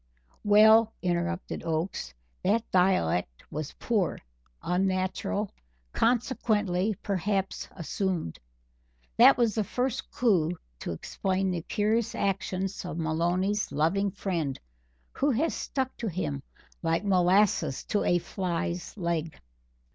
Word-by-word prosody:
"Well," 220 +2 +6
interrupted 175 +1 -1
Oakes, 160 - -2 0.3
"that 215 +4 +2
dialect 90 - +2
was 150 -1 -4
poor 215 -6 0 0.5
unnatural, 185 +2 0 0.4
consequently 215 -5 +1
perhaps 195 0 -1
assumed. 175 - -3 0.8
That - - +8
was 235 -3 +2
the 220 - 0
first 250 +5 -2
clue 180 -8 +2 0.2
to - - -4
explain 190 - -1
the 175 -2 -2
curious 215 +5 0
actions 195 0 -2
of 175 -3 -5
Maloney's 175 +5 0
loving 165 +8 +1
friend, 175 -8 -2 0.5
who 285 - 0
has 280 +6 +1
stuck 265 -1 -3
to 230 - -3
him 160 -7 -2 0.4
like 165 +3 0
molasses 185 -5 +3
to 205 - 0
a 175 - +3
fly's 175 +1 -3
leg." 170 -3 -2
185 Hz, 110 wpm, -28 LUFS, 170-210 Hz, 0.8 s, That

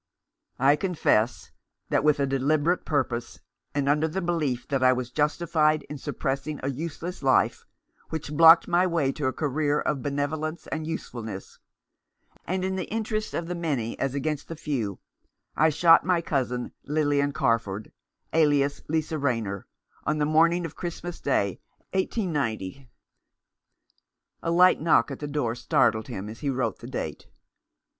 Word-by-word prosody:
"I 140 +2 +4
confess 145 - +1 0.4
that, - - +2
with 150 -1 +3
a 140 - +3
deliberate 145 +6 +1
purpose, 120 -5 -2 0.4
and 140 -1 0
under 150 +2 +3
the 170 +4 -3
belief 150 -9 -1
that 135 -2 0
I 130 0 +6
was 125 -1 -2
justified 155 +1 +1
in 150 - -6
suppressing 140 +3 -3
a 135 - 0
useless 165 +5 -5
life, 135 -2 +2 0.4
which 155 -2 -5
blocked 165 +1 +8
my 180 +2 +3
way 165 -6 +1
to 145 -1 -2
a - - +1
career 145 +1 0
of 145 -3 -1
benevolence 150 +3 -2
and 155 0 -4
usefulness, 110 -11 -6 0.9
and 185 +1 -1
in 190 0 -1
the 185 - -4
interests 215 -1 -2
of 170 - -2
the 180 - -2
many 145 -10 -2
as 135 0 -1
against 150 +1 -2
the 165 - -6
few, 120 - -3 0.6
I 160 +1 +4
shot 165 +2 +6
my 180 -1 +2
cousin, 125 -6 -2
Lilian 145 -1 +1
Carford, 115 -7 -1 0.4
alias 145 -3 +3
Lisa 160 0 -1
Rayner, 115 -8 -2 0.4
on 155 - +1
the 150 - +1
morning 165 +3 +3
of 165 - -7
Christmas 175 0 -6
Day, 100 -9 0 0.3
189—." 140 - -2 1.5
A - - -2
light 180 +1 +5
knock 135 -8 +3
at - - -6
the 150 - -4
door 145 -6 -1
startled 110 -2 +1
him 95 +2 -5
as 110 +1 -8
he 145 - -2
wrote 130 -1 -1
the - - -9
date. - - -5
145 Hz, 150 wpm, -26 LUFS, 130-165 Hz, 1.5 s, blocked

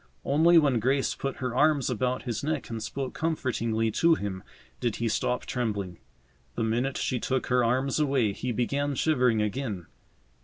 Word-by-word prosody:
Only 165 +5 +5
when 140 -7 +4
Grace 135 +4 +1
put 135 -1 -4
her 125 -2 -3
arms 145 0 +3
about 125 +1 -1
his 120 -2 -3
neck 150 -4 -2
and 115 -1 -4
spoke 135 +3 -4
comfortingly 115 -8 -1
to 165 +8 +4
him 100 -7 -4 0.4
did 120 -3 -1
he 115 - -1
stop 125 +3 -1
trembling. 100 -7 -3 0.6
The 115 - -1
minute 120 +4 0
she 125 - -1
took 130 +1 -1
her 125 -1 +4
arms 130 +5 +1
away 135 -8 +2
he 125 +5 -3
began 140 +5 -1
shivering 125 -7 +2
again. 105 -4 -3
125 Hz, 165 wpm, -27 LUFS, 115-140 Hz, 0.6 s, Only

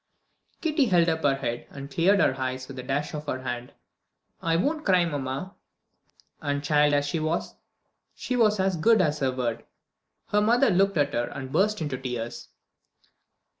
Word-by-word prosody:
Kitty 310 -4 +2
held 175 -6 +3
up 160 0 -1
her 140 -2 +3
head, 120 -3 -4
and 140 0 -9
cleared 190 +7 +3
her 145 - +3
eyes 130 0 -3
with 135 -2 -8
a - - -3
dash 140 +3 -2
of 150 -1 -6
her 130 -2 -3
hand. 125 -1 -4 0.7
"I 165 0 +1
won't 300 - 0
cry, 185 -3 +4
mamma." 145 +4 -4 0.9
And 145 -2 -2
child 150 0 +3
as 145 0 +1
she 150 +3 -2
was, 155 +2 -2 0.6
she 250 - -3
was 215 -4 +3
as 190 -1 +1
good 220 +7 +4
as 150 -4 +1
her 135 -2 +1
word. 120 -3 -3 0.7
Her 210 - +3
mother 240 +5 +4
looked 195 0 +2
at 145 -1 +1
her 120 0 0
and 130 0 -7
burst 210 +4 +1
into 135 -4 -3
tears. 120 -3 -5
150 Hz, 175 wpm, -26 LUFS, 130-190 Hz, 0.9 s, cry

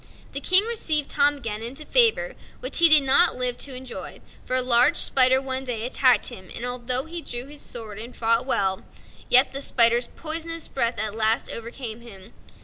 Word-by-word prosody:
The 280 - -5
King 370 +6 +3
received 320 -11 -1
Tom 290 0 +1
again 225 -5 -6
into 270 +7 -6
favor, - - +2 0.3
which - - -1
he 335 -1 +7
did 305 -2 +8
not 275 +6 +3
live 250 -1 0
to 270 -2 -3
enjoy, 255 0 -9 0.2
for 255 - -3
a 255 - +5
large 245 0 +4
spider 260 0 +4
one 265 0 -4
day 235 -3 -4
attacked 255 0 +2
him; 185 -1 -12
and 240 - -6
although 250 +1 -2
he 335 +1 -8
drew 245 -4 -6
his 290 +1 -10
sword 220 -3 -7
and 235 +3 -10
fought 230 +2 -1
well, 190 -6 -1 0.5
yet 255 +2 +7
the 275 - -6
spider's 235 -2 +2
poisonous 330 +1 -3
breath 235 -3 -3
at 215 0 -3
last 220 +1 -2
overcame 235 0 -8
him. 210 -3 -15
255 Hz, 190 wpm, -22 LUFS, 235-290 Hz, 0.5 s, did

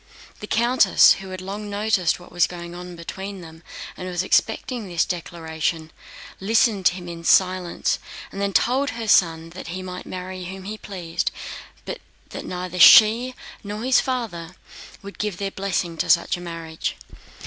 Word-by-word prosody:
The 210 - -7
countess, 235 -3 +5
who 190 - -9
had 185 0 -6
long 205 +2 -6
noticed 205 -4 +1
what 175 - -15
was 175 -1 +3
going 175 -1 -8
on 180 0 -8
between 190 +3 -7
them 160 -1 -12 0.3
and 185 - -7
was 180 0 -1
expecting 225 +3 0
this 170 -2 +1
declaration, 160 -2 -3 0.5
listened 210 -2 +3
to 175 - +2
him 180 -1 -8
in 170 -1 -7
silence 185 0 +2 0.3
and 195 - -6
then 200 0 0
told 255 - +2
her 230 -2 -5
son 165 -4 +3
that 185 - -9
he 185 +2 -5
might 180 0 -7
marry 185 0 -6
whom 190 +1 -7
he 215 +3 -6
pleased, 175 -5 -3 0.6
but - - -5 0.3
that - - -7
neither 180 0 -5
she 235 +5 +8 0.3
nor 210 +2 -5
his 255 0 +4
father 185 -10 -3 0.5
would 200 0 -10
give 210 -4 -2
their 195 0 -3
blessing 180 -4 -2
to - - -2
such 170 - +4
a 175 - -9
marriage. 165 -2 -5
185 Hz, 170 wpm, -23 LUFS, 175-205 Hz, 0.6 s, she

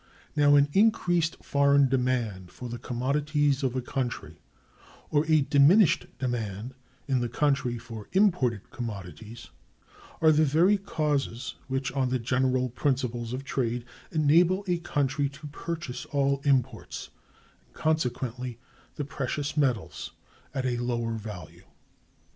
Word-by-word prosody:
Now, 145 -1 +5
an 145 0 +5
increased 175 -6 +2
foreign 140 -1 +4
demand 125 -8 -1
for 125 - -8
the 120 0 -5
commodities 140 +3 0
of 130 -2 -1
a 130 - -1
country, 125 -1 -4 0.7
or 150 +1 +2
a 155 -2 +5
diminished 145 +7 +5
demand 120 -2 -3 0.3
in 135 -2 +2
the 120 - -1
country 135 -2 +1
for 115 -2 -9
imported 165 - +2
commodities, 110 0 -7 0.7
are 160 -1 +6
the 155 +1 +4
very 170 +8 +4
causes 145 -9 -2
which, 130 -1 -2
on 130 -2 0
the 130 - +1
general 130 +1 +1
principles 125 -3 -1
of 130 +2 -4
trade, 125 -5 -2 0.3
enable 170 +5 +3
a 175 -1 +1
country 145 -3 0
to 140 +2 -12
purchase 150 -2 -5
all 140 -1 0
imports, 135 -4 0 0.6
and - - -30
consequently 125 -5 -1
(2) 115 - -24 0.4
the 145 - -3
precious 140 +1 -3
metals, 130 -8 -1 0.4
at 130 -1 -3
a 125 -1 0
lower 120 -1 -1
value. 105 -7 -8
135 Hz, 130 wpm, -27 LUFS, 120-150 Hz, 0.7 s, are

